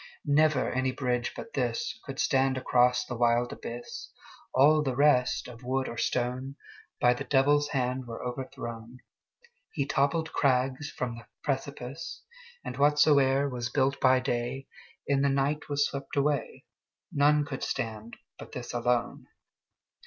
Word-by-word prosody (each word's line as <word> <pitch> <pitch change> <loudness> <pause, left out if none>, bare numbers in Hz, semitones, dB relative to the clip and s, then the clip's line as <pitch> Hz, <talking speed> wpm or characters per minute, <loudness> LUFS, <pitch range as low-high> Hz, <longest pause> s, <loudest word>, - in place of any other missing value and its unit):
Never 150 -2 +3
any 130 0 0
bridge 125 -2 -1
but 230 - -8
thisCould 130 +2 -3
stand 135 -1 +2
across 125 -1 +3
the 120 - -5
wild 120 0 +2
abyss; 120 +1 -7 0.4
All 150 +4 +5
the 135 -4 -1
rest, 140 -2 +3
of 120 -1 -11
wood 130 +1 -1
or - - -6
stone, 130 +2 -1 0.4
By 120 - +5
the 120 - -5
Devil's 145 +1 +3
hand 130 -2 -2
were 115 -1 -7
overthrown. 120 -2 -6 0.8
He 140 - -1
toppled 145 +4 0
crags 130 +1 +1
from 120 -2 -4
the 115 - -13 0.2
precipice, 140 +2 -4 0.4
And - - -5
whatsoe'er 140 -1 +4
was 120 -3 -3
built 135 +1 +1
by 130 0 +5
dayIn 125 +1 -2 0.6
the 140 - +3
night 140 +3 0
was 145 0 +2
swept 140 -1 -5
away:None 145 +1 0
could 140 -3 -6
stand 115 -2 -4 0.2
but - - -11
this 125 -1 -6
alone. 120 0 -1
130 Hz, 135 wpm, -28 LUFS, 125-140 Hz, 0.8 s, All